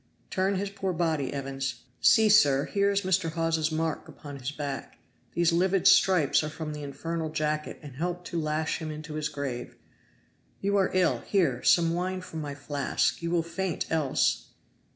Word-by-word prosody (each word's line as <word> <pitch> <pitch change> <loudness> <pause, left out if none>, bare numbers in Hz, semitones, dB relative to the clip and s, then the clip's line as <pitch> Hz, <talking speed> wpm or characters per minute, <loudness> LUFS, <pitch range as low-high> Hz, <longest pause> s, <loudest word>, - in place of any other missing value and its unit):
Turn 190 +1 +1
his 200 +1 -2
poor 195 -2 -2
body, 160 -5 0
Evans. 135 -1 -4 0.2
See, 220 -1 +6
sir, 145 -10 +5
here 200 0 +1
is 200 0 +1
Mr. 185 -4 0
Hawes's 165 -1 0
mark 160 0 -2
upon 145 -2 -10
his 130 0 -3
back. 145 -3 -5 0.4
These 170 -1 +3
livid 190 +2 +3
stripes 185 -6 +5
are 155 - -3
from 155 0 -6
the 150 - -6
infernal 160 +3 -4
jacket 155 0 -2
and 140 -4 -10
helped 175 +2 -3
to 170 -2 -2
lash 155 +1 -1
him 160 -2 -5
into 155 0 -7
his 150 -1 -2
grave. 140 -5 -5 0.8
You 200 +1 0
are 195 -2 +3
ill. 185 -2 +3
Here! 160 - +1
some 165 -1 +4
wine 185 +2 -2
from 160 -3 -7
my 145 -1 -5
flask! 140 +2 -1
You 170 - -2
will 170 -1 +1
faint 180 +1 -3
else!" 155 -5 +1
160 Hz, 175 wpm, -28 LUFS, 150-185 Hz, 0.8 s, See